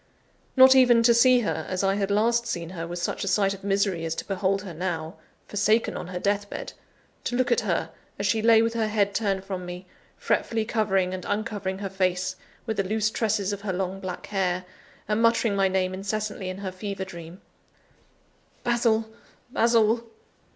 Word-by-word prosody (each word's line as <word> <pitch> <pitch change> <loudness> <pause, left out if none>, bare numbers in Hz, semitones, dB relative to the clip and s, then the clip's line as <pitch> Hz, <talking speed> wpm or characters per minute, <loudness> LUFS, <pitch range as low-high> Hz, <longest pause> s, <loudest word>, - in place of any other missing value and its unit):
Not 260 0 +9
even 245 -3 +6
to 235 0 +6
see 250 +1 +5
her, 215 - -2
as 185 +1 -1
I 195 0 +3
had 200 0 -1
last 230 +3 +2
seen 170 -5 -4
her, 165 -2 -5
was 175 +1 -5
such - - -2
a - - -3
sight 195 0 +2
of 195 - -11
misery 195 -3 0
as 165 0 -2
to - - -5
behold 195 0 0
her 185 -4 -7
now, 165 0 -4 0.3
forsaken 215 +2 +1
on - - -5
her 180 0 -5
deathbed, 205 +2 -2 0.5
to 245 - -2
look 255 +1 +1
at 475 - +4
her, - - -1 0.3
as - - -2
she 225 - +2
lay 225 0 +6
with 230 0 0
her 225 -2 0
head 205 -2 +1
turned 200 -3 0
from 190 -2 -5
me, 180 +1 -7 0.3
fretfully 225 -1 0
covering 195 -5 +1
and 185 -1 -5
uncovering 205 -2 -2
her 195 0 -4
face 185 -1 0 0.3
with 220 -2 -3
the 195 - +2
loose 215 +2 0
tresses 210 -3 0
of 200 - -6
her 200 -2 -3
long 190 +1 -3
black 185 -2 -6
hair, 185 -2 -1 0.4
and 210 +2 +1
muttering 230 -2 +3
my 195 -1 +3
name 185 -1 0
incessantly 205 0 -3
in 185 - -5
her 195 -1 -5
fever 190 0 -5
dream: 170 -1 -10 1.2
"Basil! 230 -2 +2 0.4
Basil! 230 -1 +3
200 Hz, 190 wpm, -26 LUFS, 185-220 Hz, 1.2 s, Not